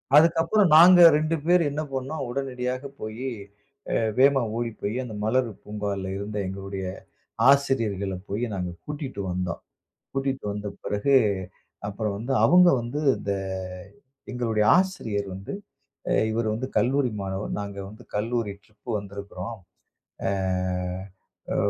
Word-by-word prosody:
அதற்கப்பறம் 165 +4 +5
நாங்க 175 +2 +9 0.2
2 155 +2 0
பேரு 175 0 +5
என்ன 150 +2 -2
பண்னோம். 135 +3 -3
உடனடியாக 130 0 -3
போயி, 110 +5 -4 0.6
அ - - +1 0.2
வேமா 135 +1 +5 0.2
ஓடி 120 -1 -1
போயி. 105 +3 -2
அந்த 115 -4 -7
மலர் 125 +2 +2
பூங்கால 100 -2 -3
இருந்த 105 +1 -5
எங்களுடைய 95 0 -5 0.6
ஆசிரியர்கள 115 -9 +2
போயி 105 +5 -1
நாங்க 90 -2 -3
கூட்டிட்டு 145 -7 -5
வந்தோம். 90 -1 -3 0.5
கூட்டிட்டு 135 -2 -2
வந்த 105 0 -4 0.2
பிறகு. 120 +7 +2 0.7
அப்பறம் 105 0 -2
வந்து 120 +6 -2
அவுங்க 180 0 +7
வந்து 120 +5 -4 0.2
இந்த 100 - -2 1.0
எங்களுடைய 115 -4 0
ஆசிரியர் 115 - -1
வந்து, 95 +1 -7 0.6
அ - - +3 0.2
இவர் 110 0 0
வந்து 125 +4 -3
கல்லூரி 130 0 +2
மாணவர், 95 +1 -4
நாங்க 100 -1 -6
வந்து 105 +2 -13
கல்லூரி 115 0 -1
ட்ரிப் 110 +3 -9
வந்திருக்கிறோம். 100 +2 -7 0.7
அ - - +1 1.2
ஓ - - 0
115 Hz, 125 wpm, -25 LUFS, 100-135 Hz, 1.2 s, நாங்க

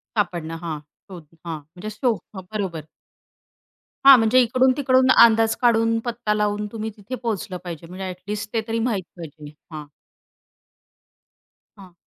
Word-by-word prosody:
सापडणं 175 -6 -2
हां. 160 -3 -4 0.3
शोध, 175 -4 -10 0.2
हां 165 -2 -4
म्हणजे 175 +8 -10
शो 225 +1 0 0.3
बरोबर. 180 -8 -4 1.2
हां, 275 -1 +11
म्हणजे 225 +2 +4
इकडून-तिकडून 255 +1 +3
अंदाज 225 -2 +5
काढून 230 -1 +3
पत्ता 235 -2 -1
लावून 210 0 -1
तुम्ही 220 -1 -4
तिथे 210 +5 -6
पोहोचलं 215 -6 -4
पाहिजे, 170 -2 -8
म्हणजे 185 +2 -7
ॲट 185 -1 -5
लीस्ट 210 +1 -5
ते 225 - +1
तरी 225 0 -1
माहीत 225 -5 -1
पाहिजे, 155 -3 -10 0.2
हां. 150 -1 -7 1.9
हां. 185 -3 -14
210 Hz, 135 wpm, -22 LUFS, 175-230 Hz, 1.9 s, हां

